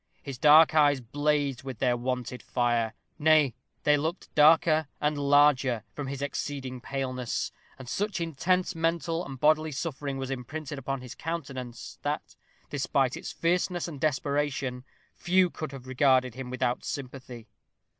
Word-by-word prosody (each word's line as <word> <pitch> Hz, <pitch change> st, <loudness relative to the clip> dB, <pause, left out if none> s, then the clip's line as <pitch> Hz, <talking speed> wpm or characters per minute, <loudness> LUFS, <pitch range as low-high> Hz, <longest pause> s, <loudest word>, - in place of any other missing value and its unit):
His 135 Hz, -4 st, -7 dB
dark 155 Hz, +3 st, +7 dB
eyes 145 Hz, -3 st, +4 dB
blazed 145 Hz, +1 st, 0 dB
with 130 Hz, -3 st, -7 dB
their 125 Hz, +1 st, +2 dB
wonted 125 Hz, 0 st, -3 dB
fire 120 Hz, -2 st, 0 dB, 0.2 s
nay, 155 Hz, -4 st, +4 dB, 0.3 s
they 150 Hz, 0 st, +4 dB
looked 160 Hz, +5 st, -4 dB
darker 155 Hz, 0 st, +5 dB
and 150 Hz, 0 st, +1 dB
larger 140 Hz, -4 st, +3 dB
from 145 Hz, -2 st, -5 dB
his 140 Hz, +1 st, -4 dB
exceeding 135 Hz, -2 st, -4 dB
paleness, 130 Hz, -2 st, -3 dB, 0.3 s
and 130 Hz, -1 st, -10 dB
such 195 Hz, -, -2 dB
intense 175 Hz, +3 st, 0 dB
mental 165 Hz, 0 st, -1 dB
and 135 Hz, -5 st, -8 dB
bodily 155 Hz, +2 st, +3 dB
suffering 140 Hz, -2 st, -4 dB
was 135 Hz, 0 st, -4 dB
imprinted 140 Hz, +3 st, -5 dB
upon 135 Hz, 0 st, -3 dB
his 125 Hz, -1 st, -8 dB
countenance, 130 Hz, -7 st, -6 dB
that, -, -, -3 dB, 0.3 s
despite 135 Hz, -2 st, 0 dB
its -, -, -6 dB
fierceness 175 Hz, +1 st, 0 dB
and 145 Hz, -5 st, -8 dB
desperation, 140 Hz, -3 st, -1 dB, 0.3 s
few 180 Hz, 0 st, +2 dB
could 155 Hz, -3 st, -6 dB
have 135 Hz, -2 st, -9 dB
regarded 130 Hz, -1 st, +3 dB
him 130 Hz, 0 st, -7 dB
without 125 Hz, -1 st, -1 dB
sympathy. 125 Hz, -4 st, -7 dB
140 Hz, 145 wpm, -28 LUFS, 130-155 Hz, 0.3 s, dark